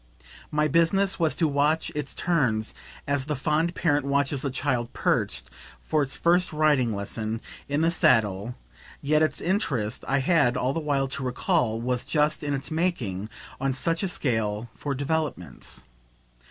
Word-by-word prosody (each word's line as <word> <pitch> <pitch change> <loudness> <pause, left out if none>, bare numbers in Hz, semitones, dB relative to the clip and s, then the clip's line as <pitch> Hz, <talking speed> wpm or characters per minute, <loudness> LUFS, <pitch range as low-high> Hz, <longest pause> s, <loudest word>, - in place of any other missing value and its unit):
My 150 0 +2
business 170 +6 +2
was 160 -2 +2
to 165 - +2
watch 150 +2 +1
its 145 -2 -4
turns 125 -11 0 0.3
as 140 -1 0
the 150 0 -1
fond 155 +5 0
parent 145 -4 +2
watches 140 0 0
a 140 - 0
child 125 -3 -1
perched, - - 0 0.3
for 155 - 0
its 140 -1 -1
first 175 +2 +3
riding 150 -7 +2
lesson, 110 +2 -3 0.3
in 145 +2 +1
the 165 +1 +3
saddle; 115 - +2 0.5
yet 150 +2 +3
its 155 - +1
interest, 145 - -1
I 135 - +2
had 140 -3 +3
all 130 +2 0
the 165 - -1
while 140 -3 0
to 135 0 -4
recall, 125 -2 0
was 125 +1 -1
just 150 0 +1
in 145 -2 -1
its 135 +2 -5
making, 125 - -1 0.3
on 135 0 0
such 165 +5 -1
a 195 - 0
scale, 110 - -1
for 140 -2 -3
developments. 140 - -3
140 Hz, 160 wpm, -26 LUFS, 125-155 Hz, 0.5 s, first